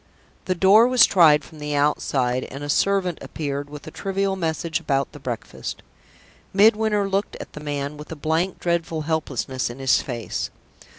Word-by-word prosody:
The 185 - 0
door 200 +6 +6
was 255 -1 +6
tried 160 -6 +5
from 155 - -14
the 150 0 -3
outside, 130 -3 +1
and 140 +2 -8
a 145 - -5
servant 185 +1 +1
appeared 145 -2 -4
with 145 0 -10
a 155 - -8
trivial 195 +1 -1
message 165 -2 -2
about 135 -1 -1
the 145 - -11
breakfast. 125 -4 -6 0.7
Midwinter 210 0 +4
looked 195 +1 -1
at - - -9
the - - -8
man 145 0 -4
with 150 +2 -10
a - - -4
blank, 160 +5 -1
dreadful 170 -2 -1
helplessness 140 -5 -2
in 120 - -8
his 135 -1 +3
face. 120 -4 -4
155 Hz, 170 wpm, -23 LUFS, 145-190 Hz, 0.7 s, door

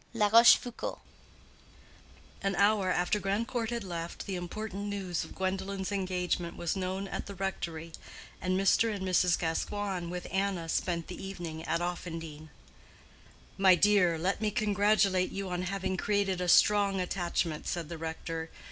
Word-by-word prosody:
—LA 210 -2 +3
ROCHEFOUCAULD. 235 +2 +5 1.4
An 195 0 0
hour 200 0 +3
after 180 +3 +1
Grandcourt 225 +4 -1
had 235 -2 -3
left, 170 -2 -5
the 195 - -3
important 200 +3 -5
news 190 -4 -2
of - - -11
Gwendolen's 190 +1 -2
engagement 180 -3 -2
was 170 +2 -1
known 190 +1 -3
at - - -5
the 200 - -7
rectory, 170 -4 -4 0.5
and 185 +1 0
Mr. 220 +3 +3
and 195 -2 -4
Mrs. 180 -1 +3
Gascoigne, 180 +2 -2
with 180 0 -5
Anna, 190 -3 -1
spent 170 -1 -1
the - - -8
evening 170 -5 -6
at 165 +2 0
Offendene. 165 -3 -5 1.1
"My 190 -2 +7
dear, 180 -2 +4
let 185 +6 -1
me 215 - +2
congratulate 205 -2 +2
you 195 -1 -4
on 180 0 -1
having 190 0 -2
created 200 -3 0
a 180 - -1
strong 200 +1 +5
attachment," 175 -3 -2
said 170 -3 -2
the 165 0 -7
rector. 160 0 -4
185 Hz, 145 wpm, -30 LUFS, 175-200 Hz, 1.4 s, My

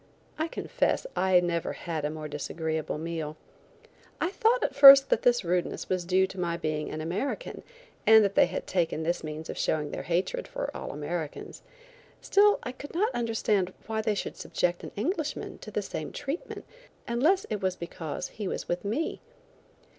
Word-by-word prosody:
I 315 - +1
confess 335 - -1
I 185 -1 +4
never 170 -1 -1
had 160 -4 -4
a - - 0
more 155 0 -6
disagreeable 155 +1 -3
meal. 160 -1 -4 0.8
I 345 - 0
thought 455 +5 +2
at - - 0
first 275 -1 +10
that - - +3
this 245 -2 +3
rudeness 175 +1 -1
was 185 -2 -1
due 185 +2 +3
to 190 0 -9
my 170 -1 -1
being 155 -2 -2
an 155 - -5
American 200 - -3 0.5
and 220 -1 +8
that 200 - 0
they - - +5
had 180 - -4
taken 165 -3 0
this 170 +2 -1
means 155 +1 -6
of - - -6
showing 150 -2 0
their - - -4
hatred 180 - -1
for - - -5
all - - -5
Americans. 150 +1 -5 0.6
Still 415 +1 +4
I - - -4
could 285 +5 -10
not 430 +7 +1
understand 215 -5 0
why 220 0 -2
they 215 -1 0
should - - -4
subject 175 0 -1
an - - -7
Englishman 300 - -3
to - - -9
the - - -2
same - - -5
treatment 290 +4 -5 0.4
unless 315 - +2
it 210 - -2
was 185 -1 0
because 165 -3 -5
he 210 -3 -5
was - - -4
with 175 +1 -2
me. 230 +11 -2
185 Hz, 180 wpm, -28 LUFS, 165-260 Hz, 0.8 s, first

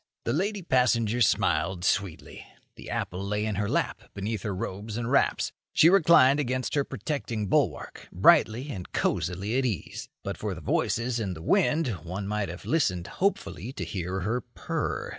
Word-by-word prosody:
The 115 - -1
lady 195 +5 -1
passenger 120 -5 +2
smiled 95 -4 +2
sweetly. 95 -4 -1 0.3
The - - -10
apple 90 +2 -3
lay 105 +2 -1
in 110 - -1
her 100 +1 -1
lap - - -1
beneath 105 +1 -3
her 100 -1 -3
robes 105 +4 -5
and 120 +1 -2
wraps. 140 - +2 0.2
She 165 - +6
reclined 155 -7 +6
against 130 -4 -1
her 140 - +2
protecting 120 -4 -3
bulwark, - - -1
brightly 130 - +4
and 95 -8 -7
cosily 95 +8 0
at - - 0
ease. 105 -10 -4
But - - -4
for - - -3
the - - -8
voices 115 +1 0
and 95 -5 -3
the 80 - -9
wind 165 - +2
one 95 +3 -5
might 105 -2 -1
have 90 +2 -8
listened 90 - +1 0.2
hopefully 105 - -1
to - - -4
hear 95 0 -3
her 110 +7 -1
purr. - - -4
110 Hz, 170 wpm, -27 LUFS, 95-135 Hz, 0.3 s, She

